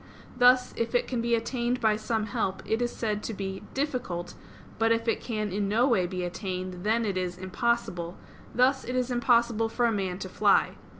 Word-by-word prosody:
Thus, 250 0 +5
if 230 +1 -1
it 245 - +2
can 245 -3 -1
be 235 0 +2
attained 240 +1 -1
by 220 -2 +3
some 220 0 -1
help, 195 -2 -2
it 220 +2 0
is 240 0 0
said 210 -2 -2
to 225 - -4
be 190 -1 -4
"difficult"; 250 - -2 0.5
but 225 0 +3
if 230 0 +1
it 225 - +1
can 215 -4 -3
in 200 +1 -1
no 235 +5 +3
way 190 -9 +2
be 180 0 -4
attained, 185 0 -4
then 225 +2 +2
it 195 -3 -1
is 180 -1 -2
"impossible"; 185 -2 -1 0.3
thus 265 +2 +3
it 250 - -4
is 255 0 0
impossible 235 -2 +2
for 240 +2 +1
a 235 - +3
man 190 -4 -2
to 190 - -5
fly. 185 - +3
225 Hz, 200 wpm, -28 LUFS, 190-240 Hz, 0.5 s, Thus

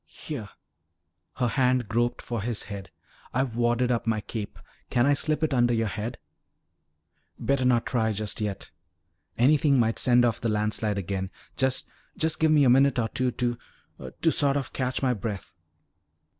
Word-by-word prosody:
"Here." 125 -9 -7 0.9
Her 125 - 0
hand 125 -2 +2
groped 120 +2 0
for 120 -3 -3
his 115 0 -1
head. 100 -2 -8 0.5
"I've 130 -3 0
wadded 120 +1 +1
up 120 -1 -1
my 110 -1 +1
cape. 105 0 -6 0.3
Can 120 0 +2
I 145 - +4
slip 155 +2 0
it 155 - +1
under 120 -2 +3
your 115 -1 0
head?" 115 +4 -4 1.2
"Better 135 -1 0
not 120 -2 +3
try 110 -3 +1
just 105 +1 -3
yet. 105 -2 -4 0.7
Anything 140 +2 +4
might 115 -1 +1
send 120 -1 +4
off 115 - 0
the 115 - 0
landslide 105 0 0
again. 95 0 -3 0.3
Just 130 -1 0 0.3
just 160 0 0
give 160 - +3
me 150 -2 +5
a - - +5
minute 135 +1 +4
or 115 -2 0
two 130 +2 0
to 120 -1 -2 0.6
to 165 - +5
sort 140 -2 +2
of 135 -3 -4
catch 130 0 -2
my 130 -1 +3
breath." 105 -2 -5
120 Hz, 170 wpm, -26 LUFS, 110-130 Hz, 1.2 s, me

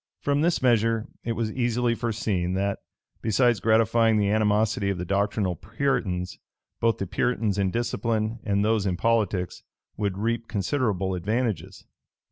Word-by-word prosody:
From 145 0 +1
this 170 -3 +1
measure, 115 -2 +3 0.2
it 115 - -1
was 115 -1 -2
easily 120 0 +1
foreseen, 105 -6 -1
that, 100 +1 -1 0.4
besides 120 0 +2
gratifying 115 0 +3
the 100 -1 +2
animosity 105 -1 +2
of 100 - -1
the 90 - -4
doctrinal 100 0 0
Puritans, 105 - -2 0.4
both 115 0 +2
the 100 - -3
Puritans 105 +1 0
in 95 -1 +2
discipline 115 0 -1
and 100 0 +1
those 110 -2 +1
in 90 -2 -1
politics 105 -5 0 0.4
would 100 -3 -1
reap 115 +2 -1
considerable 100 -4 -1
advantages. 110 +5 -2
110 Hz, 140 wpm, -26 LUFS, 100-115 Hz, 0.4 s, measure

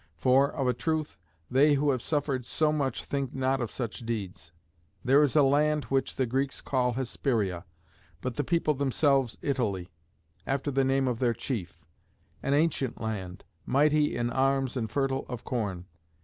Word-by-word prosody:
For, 135 - +4
of 135 -4 -2
a 125 - +3
truth, 155 +5 -2 0.3
they 145 +3 +5
who 145 +1 +2
have 130 -3 -1
suffered 140 -3 -1
so 150 +5 +1
much 140 -5 -1
think 140 -2 -3
not 130 0 +1
of 120 - -2
such 115 -1 -4
deeds. 100 -8 -5 0.5
There 135 +3 +6
is 145 -1 +2
a 150 - +6
land 150 +2 +3
which 135 0 -1
the 130 - +1
Greeks 135 +3 -1
call 125 -3 0
Hesperia, 110 -7 -1 0.5
but 125 - -3
the 145 - 0
people 165 0 +1
themselves 135 -2 +1
Italy, 105 -11 -1 0.6
after 140 +1 -1
the 135 0 +2
name 135 0 +2
of 120 -2 -1
their 120 -3 +1
chief; 90 - -5 0.6
an 140 - +1
ancient 145 -5 0
land, 100 -5 -5 0.2
mighty 150 +1 +2
in 120 0 -1
arms 135 0 +1
and 115 -4 -2
fertile 135 +2 0
of 125 -3 -6
corn. 100 -8 -3
135 Hz, 165 wpm, -28 LUFS, 120-140 Hz, 0.6 s, There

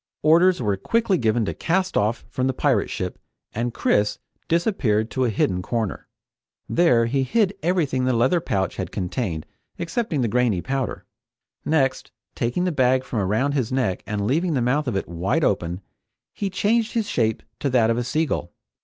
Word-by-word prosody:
Orders 170 +4 +5
were 105 -5 0
quickly 215 - +1
given 110 0 +1
to 85 - -2
cast 185 - 0
off 105 +3 0
from 130 +3 -1
the 130 - -1
pirate - - +1
ship - - -4 0.3
and 120 +2 -1
Chris 105 -2 +1 0.3
disappeared 135 - +1
to 130 -1 0
a - - +1
hidden 95 -3 0
corner. 110 +1 -3 0.6
There 125 -9 +3
he 135 +4 0
hid 200 - +1
everything 155 -7 +1
the 130 - +2
leather 145 +9 +2
bag 95 -8 -1
had 95 -3 -5
contained 90 - -3 0.3
excepting 170 - -1
the 120 - +1
grainy 115 -4 +1
powder. 135 -3 -3 0.6
Next, 140 -4 +1 0.2
taking 120 +10 -1
the 180 - +1
bag 130 -3 +2
from 115 - -3
around 110 +9 +1
his 135 -5 -1
neck 125 -9 0
and 105 -1 -2
leaving 160 - +1
the - - +2
mouth 140 +4 +1
of 120 - -1
it 95 - -2
wide 95 - -1
open, 90 -4 0 0.5
he 200 - -2
changed 220 +4 +1
his 225 -3 0
shape 110 -2 0 0.2
to 140 - 0
that 115 -3 +3
of 115 - 0
a - - -1
sea 155 +7 0
gull. 85 - -3
125 Hz, 180 wpm, -23 LUFS, 110-165 Hz, 0.6 s, Orders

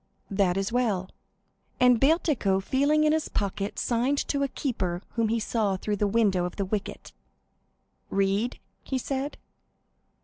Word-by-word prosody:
"That 195 -2 +2
is 195 +3 -1
well." 215 -7 0 0.7
And 250 -2 +5
Bertuccio, 275 - +2
feeling 285 +9 +2
in 305 0 +4
his 315 -1 -1
pocket, 200 0 -2
signed 250 +4 +1
to 280 - 0
a 280 - +2
keeper 190 -10 -3
whom 230 -1 0
he 230 +2 +1
saw 210 -3 0
through 205 +2 -2
the 205 - +1
window 200 -4 +2
of 180 - -5
the 200 - -1
wicket. 205 +1 -4 1.0
"Read?" 195 +4 0 0.2
he 265 - -3
said. 270 +2 -3
220 Hz, 145 wpm, -27 LUFS, 195-265 Hz, 1.0 s, And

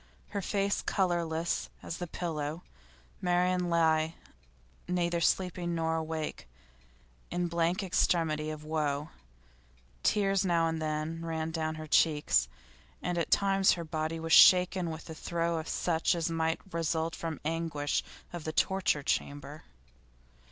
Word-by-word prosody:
Her 205 -1 -3
face 200 +1 0
colourless 170 -3 0
as 165 - -5
the 175 - -4
pillow, 160 -1 -4 0.6
Marian 180 0 +1
lay 160 -1 +2 0.7
neither 175 -1 0
sleeping 175 -1 0
nor 160 0 0
awake, 160 -1 -4 0.8
in 175 0 -1
blank 170 +3 0
extremity 160 -4 +1
of 155 -1 -6
woe; 150 -1 -1 0.9
tears 195 -2 +2
now 170 -3 +2
and 160 0 -2
then 155 +1 -2
ran 160 -1 -2
down 160 -1 -2
her 155 0 -7
cheeks, 155 -1 +3 0.6
and 180 - -1
at 165 - -1
times 195 -1 +4
her 170 - -4
body 155 +1 -2
was 165 0 -1
shaken 180 -1 +7
with 160 -1 -7
a 160 - -6
throe 170 0 -1
such 165 +1 0
as 165 0 -1
might 160 0 0
result 165 0 -1
from 165 -2 -4
anguish 160 -2 -1 0.3
of 175 -2 -5
the 155 - -3
torture 185 -5 +1
chamber. 145 +2 -3
165 Hz, 130 wpm, -30 LUFS, 160-175 Hz, 0.9 s, shaken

